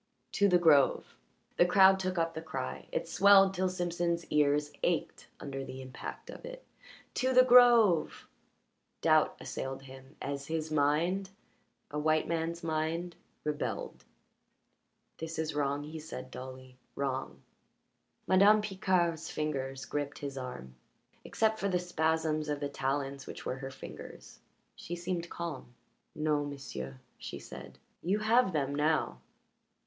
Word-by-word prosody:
"To 200 - +3
the 180 -2 +5
grove!" 155 -6 +4 0.4
The 175 - +6
crowd 190 +1 +6
took 185 -1 -2
up 165 0 0
the 160 - -5
cry; 155 - -5
it - - -2
swelled 195 -1 +6
till 185 0 0
Simpson's 175 -1 -1
ears 150 0 +2
ached - - -1
under 135 -1 -5
the 130 0 -8
impact 130 -1 -8
of - - -11
it. - - -9 0.5
"To 260 0 +1
the 255 - +9
grove!" 240 -8 +5 0.7
Doubt - - +3
assailed 135 0 -5
him 135 +1 -13
as 140 0 -4
his 160 -1 -3
mind 160 +6 +1 0.6
a 150 - -2
white 155 +1 +2
man's 170 +1 -2
mind 165 +2 -2 0.3
rebelled. 150 -1 -3 1.2
"This 160 0 -5
is 160 0 -2
wrong," 145 0 -1
he 155 +2 -7
said 155 - -8
dully; 130 0 -9 0.2
"wrong." 130 - -3 0.8
Madame 200 +3 +6
Picard's 185 -5 0
fingers 135 -3 -3
gripped 145 -1 -3
his 140 -1 -6
arm. 125 - -7 0.5
Except 220 0 0
for 200 - 0
the 180 - +2
spasms 160 -3 0
of 145 -1 -1
the 145 -1 -3
talons 135 0 -2
which - - -8
were 130 - -2
her 135 0 -5
fingers 130 - -11 0.4
she 175 - -6
seemed 175 -1 -3
calm. 150 -8 -6 0.4
"No, 150 -1 +1
m'sieu'," 140 - -6 0.2
she - - -6
said. 65 0 -10 0.2
"You 190 +4 +1
have 220 0 +3
them 140 -4 -1
now. 155 +2 +1
155 Hz, 140 wpm, -31 LUFS, 140-180 Hz, 1.2 s, the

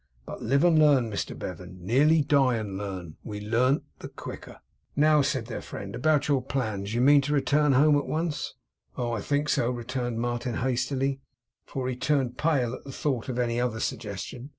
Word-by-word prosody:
'But - - -8
live 140 +6 +2
and 170 -3 +5
learn, 140 -7 +4
Mr 100 - -3
Bevan! 90 +1 -7
Nearly 150 +8 +4
die 135 -3 +3
and 105 -4 -4
learn; 95 -5 -6
we 105 -1 -6
learn 120 +7 +1 0.2
the - - -7
quicker.' - - -9 0.4
'Now,' 150 +1 +5
said 130 -3 -1
their 115 - -5
friend, 100 +2 -7
'about 150 +3 +2
your 140 -3 +2
plans. 110 -6 -3
You 120 - +2
mean 140 +2 +6
to 145 +2 -2
return 145 +1 +3
home 145 +3 +5
at 145 - 0
once?' 160 -1 -2 0.4
'Oh, 120 -1 -1
I 115 -3 -2
think 145 +6 0
so,' 120 - +2
returned 120 -1 -3
Martin 120 0 -2
hastily, 130 +2 -1 0.5
for 130 -2 -3
he 130 - -2
turned 130 -2 0
pale 135 -7 +1
at - - -8
the 135 - -8
thought 130 -3 -2
of 125 - -3
any 120 -1 0
other 120 -3 -1
suggestion. 110 +5 -5
125 Hz, 190 wpm, -27 LUFS, 115-145 Hz, 0.5 s, mean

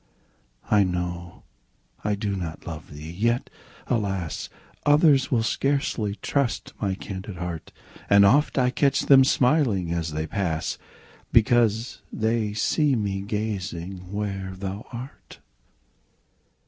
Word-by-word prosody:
I 105 -2 +6
know 90 -1 -4 0.6
I 105 0 +1
do 100 -1 -2
not 85 -4 -5
love 80 -2 -7
thee! 75 +2 -8
yet, 115 +7 0 0.3
alas! 95 -8 -2 0.3
Others 145 -2 +5
will 115 -4 +2
scarcely 115 -4 0
trust 140 -4 -1
my 100 -3 0
candid 95 0 -7
heart; 85 -2 -5 0.4
And 100 0 +7
oft 140 +10 +4
I 125 -1 +3
catch 140 +1 +2
them 135 -1 +7
smiling 125 - +2
as 80 -2 -2
they 80 +1 -2
pass, 85 -3 -2 0.5
Because 115 0 +3
they 110 -1 0
see 145 +6 +2
me 100 -3 -1
gazing 95 -3 -4
where 100 -2 -3
thou 100 +3 -5
art. 125 +3 -9
100 Hz, 120 wpm, -25 LUFS, 90-120 Hz, 0.6 s, And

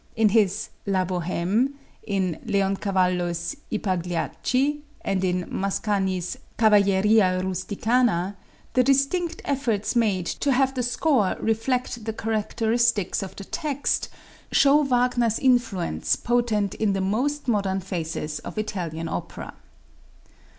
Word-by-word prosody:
In 220 -2 +4
his 205 -1 +2 0.2
"La 190 -2 +1
Bohême," 185 +8 0 0.3
in 190 -5 -1
Leoncavallo's 185 -4 0 0.2
"I 220 - +1
Pagliacci" 205 - -1 0.2
and 190 -1 -1
in 180 -1 0
Mascagni's 190 -2 -1 0.2
"Cavalleria 200 -2 +4
Rusticana," 195 +1 0 0.4
the 255 - +4
distinct 275 +6 +1
efforts 245 -7 -1
made 205 -7 +2
to 280 - -1
have 265 +1 +2
the 255 - -1
score 245 - +1
reflect 240 +1 -1
the 220 - -2
characteristics 225 -1 0
of 190 -1 -7
the 200 - -8
text 290 - -1 0.4
show 285 +2 +5
Wagner's 245 -4 +2
influence 190 - +1
potent 225 -5 0
in 215 -2 0
the 195 - -1
most 255 +10 -1
modern 200 -4 +1
phases 165 -5 -4
of - - -9
Italian 170 -6 -3
opera. - - -6
210 Hz, 115 wpm, -24 LUFS, 185-245 Hz, 0.4 s, show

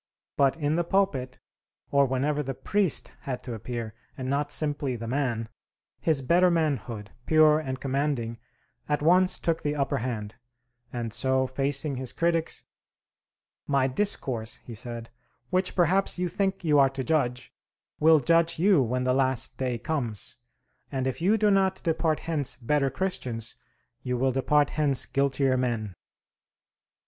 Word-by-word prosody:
But 140 +2 +3
in 150 -1 0
the 175 +2 +1
pulpit, 165 -9 0 0.5
or 140 -1 +4
whenever 140 +3 0
the 135 -2 -4
priest 200 0 0
had 130 -2 -5
to 125 - -5
appear, 115 0 -5 0.2
and 130 -1 -4
not 145 +2 -1
simply 145 -4 0
the 115 0 -6
man, 120 -3 -1 0.5
his 155 -5 +1
better 175 +7 +4
manhood, 130 - -1 0.2
pure 155 -1 +5
and 130 -4 -4
commanding, 135 -4 -2 0.5
at 150 0 0
once 180 +3 +4
took 165 -1 -1
the 145 0 -1
upper 140 -1 0
hand; 110 -4 -4 0.6
and 115 -2 -4
so, 130 +1 +1
facing 135 +2 -1
his 130 -1 -3
critics, 165 -1 0 1.0
"My 140 -2 +2
discourse," 130 - 0
he 120 - -9
said, 115 +1 -7 0.4
"which 185 0 0
perhaps 185 +3 +2
you 180 0 0
think 195 +1 -1
you 150 -3 +4
are 135 -1 +6
to 135 0 -4
judge, 125 -5 -1 0.5
will 160 0 +6
judge 165 +3 +3
you 180 -2 +4
when 125 +1 -1
the 125 0 +2
last 130 -2 0
day 125 -2 -1
comes; 120 - -4 0.6
and 130 -1 -2
if 130 +4 -3
you 200 +6 +3
do 210 -1 +3
not 190 -1 +3
depart 160 -1 0
hence 150 -5 0
better 140 +3 +1
Christians, 125 - -3 0.5
you 125 -1 -2
will 130 +2 +2
depart 145 +3 +2
hence 145 -4 +2
guiltier 135 -1 +1
men!" 115 -5 -2
140 Hz, 150 wpm, -27 LUFS, 125-160 Hz, 1.0 s, are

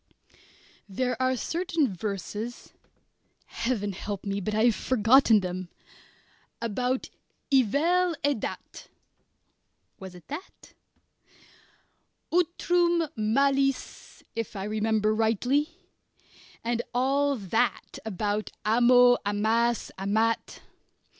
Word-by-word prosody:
There 250 +5 -1
are 260 0 +2
certain 330 - -1
verses 210 +4 -5 0.7
Heaven 220 -4 -2
help 200 +2 -6
me, 200 0 -2
but 210 +3 -2
I 220 - +2
have 235 -2 +4
forgotten 230 -2 +4
them! 185 -1 -5 0.9
about 250 +3 -2 0.4
"i 265 - +7
vel 335 - +1
e 285 - +3
dat" 220 - -7 1.1
(was 190 -2 -9
it 175 - -15
dat?) 300 +7 -9 1.6
"utrum 345 -1 +2
malis" 275 +5 0
if 230 -2 -4
I 195 - -4
remember 215 0 +1
rightly 240 - +1 0.9
and 235 0 0
all 280 +3 +2
that 225 +2 -1
about 210 0 -2 0.2
amo, 245 +2 +6
amas, 220 +3 0
amat. 220 +4 0
230 Hz, 95 wpm, -27 LUFS, 210-275 Hz, 1.6 s, i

